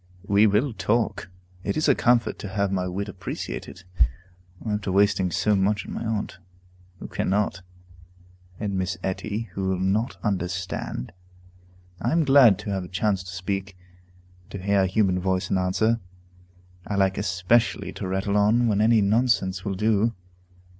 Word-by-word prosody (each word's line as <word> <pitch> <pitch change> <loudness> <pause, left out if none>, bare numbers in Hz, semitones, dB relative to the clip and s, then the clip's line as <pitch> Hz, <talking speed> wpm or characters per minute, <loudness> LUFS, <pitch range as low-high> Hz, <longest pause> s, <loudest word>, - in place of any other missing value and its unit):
We 100 +1 +5
will 110 +6 +1
talk; 105 -3 -1 0.3
it - - -2
is 155 - +1
a 140 - +6
comfort 120 -1 +2
to - - -5
have 100 0 -1
my 90 -1 -1
wit 100 +3 -3
appreciated, 95 -1 -6 0.8
after 105 -2 -1
wasting 95 -1 +3
so 105 +4 +1
much 100 +1 +1
on - - -7
my - - -4
aunt, 105 -5 -3 0.6
who - - -8
cannot, 100 -1 -1 1.0
and 105 -2 -2
Miss 95 0 -2
Etty, 105 +3 -3
who 95 +1 -3
will 95 -1 0
not 100 +6 0
understand. 90 - -3 0.9
I 120 - 0
am 165 -2 +3
glad 135 -8 +7
to 105 - -5
have 95 -2 -2
a - - -9
chance 95 +1 0
to 90 -1 -9
speak, 95 +1 -4 0.6
and 90 - -29
to - - -3
hear 100 +1 +2
a 95 - +2
human 95 -1 +2
voice 95 0 -1
in 95 - +2
answer. 110 +5 +1 0.9
I 100 - -2
like 95 -1 +2
especially 100 +1 +1
to 95 - -5
rattle 95 +2 0
on 110 +4 +3
when 105 -2 +2
any 110 0 +4
nonsense 100 -4 +1
will 100 -2 -2
do. 110 +3 +1
100 Hz, 160 wpm, -25 LUFS, 95-110 Hz, 1.0 s, glad